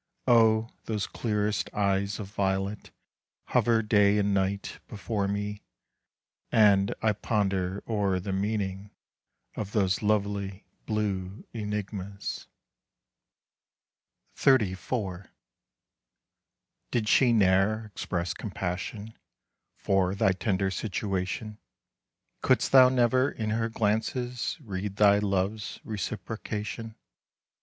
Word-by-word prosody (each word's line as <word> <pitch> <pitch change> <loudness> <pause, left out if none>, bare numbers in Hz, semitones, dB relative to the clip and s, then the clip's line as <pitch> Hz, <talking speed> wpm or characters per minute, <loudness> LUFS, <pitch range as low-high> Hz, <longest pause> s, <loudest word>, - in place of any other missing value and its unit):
Oh, 115 -2 +4
those 105 -3 -1
clearest 105 -2 -1
eyes 100 0 0
of 100 -2 -6
violet 95 +1 -1 0.6
Hover 115 -1 +3
day 105 -1 +4
and 100 -1 +2
night 100 +1 -1
before 100 0 -2
me, 105 +1 -3 0.9
And 100 -3 +4
I 110 -1 +3
ponder 100 -2 -1
o'er 100 -4 +1
the 95 +1 -4
meaning 100 0 -2 0.7
Of 105 -1 -5
those 95 -3 +1
lovely 100 -2 -1 0.2
blue 100 -2 -2
enigmas. 105 -2 -4 1.9
XXXIV. 100 -5 +1 1.6
"Did 115 -3 -1
she 125 +2 +5
ne'er 105 +1 +3
express 90 -4 -3
compassion 100 +2 -5 0.6
For 95 -1 +1
thy 95 - +3
tender 95 0 0
situation? 100 +1 -3 0.8
Could'st - - +2
thou 130 -1 +8
never 130 +1 +3
in 110 -1 -3
her 115 +1 0
glances 115 +3 -1
Read 100 -1 -4
thy 100 -1 +5
love's 100 +1 -1
reciprocation? 110 +1 -5
105 Hz, 95 wpm, -28 LUFS, 95-110 Hz, 1.9 s, thou